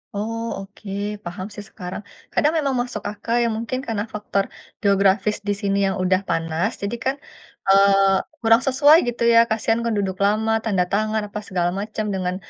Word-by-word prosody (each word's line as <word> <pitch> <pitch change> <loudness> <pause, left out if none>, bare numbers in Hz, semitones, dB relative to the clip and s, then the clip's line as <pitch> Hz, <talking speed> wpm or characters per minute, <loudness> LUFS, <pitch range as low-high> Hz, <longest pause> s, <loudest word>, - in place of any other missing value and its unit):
Oh 225 +3 -3 0.2
oke, 195 +1 -11 0.3
paham 185 +2 -5
sih 205 0 -9
sekarang. 180 0 -7 0.3
Kadang 300 +2 +2
memang 280 -5 0
masuk 245 -4 -5
akal 220 +2 -5
ya, 235 - +2
mungkin 235 +3 -3
karena 220 -5 -3
faktor 205 -2 -1 0.3
geografis 200 +1 +2
di 205 - +2
sini 200 -1 +1
yang 190 - -2
udah 185 +1 +2
panas, 165 +6 -1
jadi 200 +3 -3
kan, 265 +2 0 0.5
eee, 195 0 +5 0.2
kurang 225 -1 +4
sesuai 285 +3 +5
gitu 235 0 -2
ya, 230 0 +6
kasihan 225 +1 +1
kan 230 -1 -1
duduk 190 -1 -2
lama, 215 +2 +2
tanda 195 -5 +1
tangan, 215 +3 0
apa 210 0 -6
segala 175 -3 -1
macam, 215 +2 -3
dengan 185 -1 -2
205 Hz, 175 wpm, -22 LUFS, 195-230 Hz, 0.5 s, ya